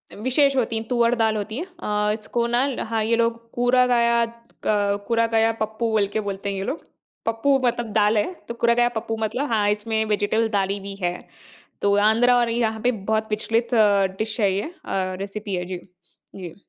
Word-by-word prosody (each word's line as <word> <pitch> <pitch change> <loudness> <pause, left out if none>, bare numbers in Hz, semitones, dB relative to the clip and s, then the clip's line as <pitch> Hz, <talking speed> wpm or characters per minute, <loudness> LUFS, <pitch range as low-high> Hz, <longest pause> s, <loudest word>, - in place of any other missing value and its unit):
विशेष 265 +6 +2
होती 230 -3 0
है, 220 - -3
तुअर 240 -1 +3
दाल 220 -2 +1
होती 215 +3 -4
है। 335 - -3
अ, 210 - -2
इसको 230 +2 -2
ना 240 +3 +2
ल 270 - -4
हाँ, 225 -1 -1
ये 230 +2 +2
लोग 230 0 -1
कुरा 250 +1 +3
गयात 235 -1 +1 0.2
क 205 -1 +1
कुरा 230 -1 +2
गया 225 0 +3
पप्पू 220 +2 -1
बोल 210 -2 +2
के 220 - 0
बोलते 200 0 -4
हैं 195 - -3
ये 190 - -3
लोग। 280 - -4 0.4
पप्पू 230 +5 +2
मतलब 240 -2 -1
दाल 210 0 +3
है, 210 - 0
तो - - -4
कुरा 235 0 +2
गया 240 0 +3
पप्पू 225 0 -3
मतलब 250 +6 -1
हाँ, 210 -2 +2
इसमें 220 +1 0
वेजिटेबल 215 +2 +1
डाली 200 -1 0
भी 195 0 -7
है 175 0 +1 0.7
तो 200 0 +3
आंध्रा 235 +3 +4
और 240 -1 +2
यहाँ 225 -2 0
पे 250 - +4
बहुत 220 +1 -2
प्रचलित 225 +2 0 0.5
डिश 220 +1 -3
है 200 -2 +3
ये 195 - -1
अ, 315 - -6 0.5
रेसिपी 200 +1 -5
है, 180 -1 -2
जी। 180 0 -5 0.6
जी। 180 -4 -8
225 Hz, 200 wpm, -23 LUFS, 210-235 Hz, 0.7 s, आंध्रा